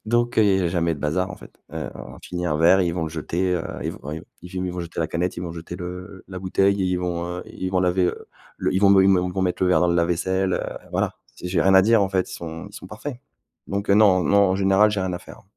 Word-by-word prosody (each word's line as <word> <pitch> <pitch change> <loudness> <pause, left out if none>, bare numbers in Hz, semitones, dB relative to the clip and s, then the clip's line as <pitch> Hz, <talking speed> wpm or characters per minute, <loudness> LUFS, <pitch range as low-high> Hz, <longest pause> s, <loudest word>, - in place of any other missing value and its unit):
Donc 120 +1 +1
heu, - - +7
il 95 -2 +3
y - - 0
a 85 - +1
jamais 85 -2 0
de - - -10
bazar 90 +6 -1
en 90 - -7
fait. - - -14 0.2
Heu, 80 -1 -4
on - - -10
finit 90 0 -4
un 75 - 0
verre 85 +4 +5
et 90 - +2
ils 85 - -1
vont 85 - -2
le 80 - -5
jeter, 85 +3 -1
heu, 85 - -2 0.2
ils - - -2
v - - -11
v 75 +3 -6 0.2
ils 90 0 -4
vont 90 - -4
jeter 85 0 -8
la 80 - +1
canette, 90 +2 -2
ils 85 - -4
vont 85 -2 -5
jeter, 85 +1 -8
heu, - - -6
le 90 +1 -8
la 95 -1 -6
bouteille 95 +2 +1
et - - +1
ils 90 0 0
vont, 90 -1 -2
heu, 90 +1 -5
ils 95 - -5
vont 90 -1 +1
laver, 90 0 +2
heu, - - -5 0.3
le - - -1
ils 95 - +2
vont 100 - +6
me 95 -1 +6
ils - - +5
vont 90 -1 +2
me - - +1
mettre 90 0 -1
le 90 - +3
verre 90 - +4
dans 90 - +3
le 85 - +2
lave-vaisselle, 90 +2 +1
heu, - - -4
voilà. - - -1 0.2
Si 90 - -6
j'ai 90 -2 +1
rien 95 +3 +4
à 95 - +8
dire 115 +1 +4
en 95 - +1
fait, 95 -1 -1
ils - - -8
sont 80 -1 -7
ils - - -18
sont - - -9
parfaits. 145 -4 -7 0.5
Donc 100 0 -3
heu, - - +6
non 100 -4 +5
non 100 +7 +4
en 95 - +1
général, 95 +2 +4
j'ai 105 - -1
rien 95 -1 -2
à 90 - -3
faire. - - -14
90 Hz, 310 wpm, -23 LUFS, 85-95 Hz, 0.5 s, à